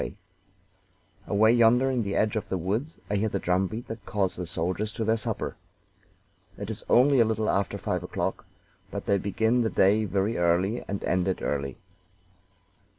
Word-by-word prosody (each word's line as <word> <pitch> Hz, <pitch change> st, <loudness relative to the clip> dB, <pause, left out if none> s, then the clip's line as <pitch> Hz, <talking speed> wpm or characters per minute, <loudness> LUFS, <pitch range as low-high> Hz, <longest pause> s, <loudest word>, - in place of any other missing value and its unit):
"Away 110 Hz, +2 st, +4 dB
yonder, 120 Hz, +3 st, +4 dB
in 125 Hz, -2 st, 0 dB
the 100 Hz, -2 st, -2 dB
edge 110 Hz, +1 st, +1 dB
of 110 Hz, -, -3 dB
the 95 Hz, -, -1 dB
woods, 105 Hz, -, -2 dB
I 105 Hz, -, 0 dB
hear 110 Hz, +2 st, +1 dB
the 100 Hz, -, -1 dB
drum 95 Hz, +1 st, +1 dB
beat 110 Hz, +5 st, -7 dB
that 115 Hz, -1 st, -7 dB
calls 95 Hz, -3 st, -1 dB
the 90 Hz, -1 st, -5 dB
soldiers 90 Hz, +5 st, -2 dB
to 115 Hz, -1 st, -3 dB
their 110 Hz, +1 st, +3 dB
supper. 110 Hz, -, -3 dB, 1.0 s
It 100 Hz, +2 st, -5 dB
is 110 Hz, -, -6 dB
only 135 Hz, +2 st, +5 dB
a -, -, +7 dB
little 110 Hz, -1 st, -1 dB
after 100 Hz, 0 st, 0 dB
five -, -, -2 dB
o'clock, -, -, -3 dB, 0.4 s
but -, -, -5 dB
they 100 Hz, -1 st, +2 dB
begin 110 Hz, +5 st, +1 dB
the 115 Hz, -, +1 dB
day 105 Hz, +3 st, +3 dB
very 100 Hz, +2 st, 0 dB
early 90 Hz, +7 st, +1 dB
and 100 Hz, 0 st, -4 dB
end 90 Hz, 0 st, +1 dB
it 95 Hz, -, -2 dB
early. 70 Hz, -2 st, -2 dB
105 Hz, 180 wpm, -27 LUFS, 95-115 Hz, 1.0 s, a